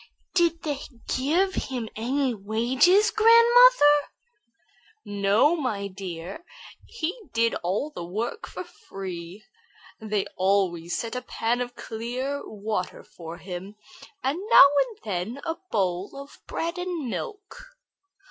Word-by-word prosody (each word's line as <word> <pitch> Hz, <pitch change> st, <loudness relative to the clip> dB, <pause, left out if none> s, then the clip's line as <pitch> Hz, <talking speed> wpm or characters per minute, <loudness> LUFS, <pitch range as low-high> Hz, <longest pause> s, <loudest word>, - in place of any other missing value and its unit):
"Did 340 Hz, -2 st, +2 dB
they 290 Hz, -3 st, -2 dB, 0.4 s
give 335 Hz, +9 st, +1 dB
him 250 Hz, -9 st, -3 dB
any 255 Hz, +3 st, 0 dB
wages, 250 Hz, -, +3 dB
grandmother?" 460 Hz, -9 st, +6 dB, 1.0 s
"No, 205 Hz, +10 st, +3 dB
my 220 Hz, -10 st, -2 dB
dear, 185 Hz, -, -7 dB, 0.4 s
he 350 Hz, -4 st, -3 dB, 0.2 s
did 230 Hz, 0 st, +2 dB
the 190 Hz, -, -2 dB
work 220 Hz, -, -4 dB
for -, -, -7 dB, 0.3 s
love. 185 Hz, 0 st, -6 dB, 0.6 s
They 210 Hz, -3 st, -1 dB
always 185 Hz, -3 st, +1 dB
set 230 Hz, +1 st, -4 dB
a 250 Hz, -, -2 dB
pan 240 Hz, 0 st, -1 dB
of 245 Hz, 0 st, -5 dB
clear 250 Hz, +6 st, -4 dB
water 210 Hz, -3 st, -4 dB
for 165 Hz, 0 st, -10 dB
him, 180 Hz, +3 st, -8 dB, 0.5 s
and 275 Hz, +6 st, 0 dB
now 280 Hz, -, +10 dB, 0.2 s
and 450 Hz, -4 st, -12 dB
then 205 Hz, +7 st, -4 dB
a 325 Hz, -, -1 dB, 0.2 s
bowl 190 Hz, +5 st, -1 dB
of 280 Hz, +1 st, -12 dB
bread 335 Hz, +2 st, -3 dB
and 355 Hz, -6 st, -3 dB
milk." 485 Hz, -, -7 dB
240 Hz, 120 wpm, -26 LUFS, 195-320 Hz, 1.0 s, now